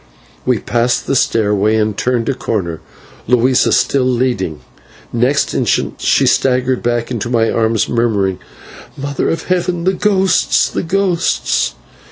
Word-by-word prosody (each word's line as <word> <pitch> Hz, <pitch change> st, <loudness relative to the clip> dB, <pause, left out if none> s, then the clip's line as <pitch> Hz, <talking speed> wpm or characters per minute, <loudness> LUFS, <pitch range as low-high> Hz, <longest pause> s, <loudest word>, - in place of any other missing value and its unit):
We 125 Hz, -2 st, +3 dB
passed 120 Hz, +3 st, 0 dB
the -, -, -1 dB
stairway 105 Hz, -3 st, +1 dB
and 110 Hz, -1 st, 0 dB
turned 120 Hz, 0 st, -1 dB
a 135 Hz, -, +1 dB
corner, 90 Hz, -10 st, -3 dB, 0.5 s
Luisa 125 Hz, +2 st, +3 dB
still 135 Hz, -2 st, +2 dB
leading. 120 Hz, -, -1 dB, 0.5 s
Next 125 Hz, +4 st, +1 dB
instant -, -, -1 dB
she -, -, +2 dB
staggered 130 Hz, -1 st, +1 dB
back 120 Hz, 0 st, -1 dB
into 120 Hz, -1 st, -3 dB
my 115 Hz, -2 st, +1 dB
arms, 110 Hz, -1 st, +1 dB
murmuring, 105 Hz, -6 st, 0 dB, 0.6 s
"Mother 140 Hz, 0 st, -2 dB
of 165 Hz, -, -2 dB
Heaven! 180 Hz, -1 st, -1 dB
the 190 Hz, +2 st, +2 dB
ghosts! 195 Hz, -1 st, +2 dB
the -, -, -2 dB
ghosts!" 170 Hz, -, 0 dB
120 Hz, 135 wpm, -15 LUFS, 110-135 Hz, 0.6 s, We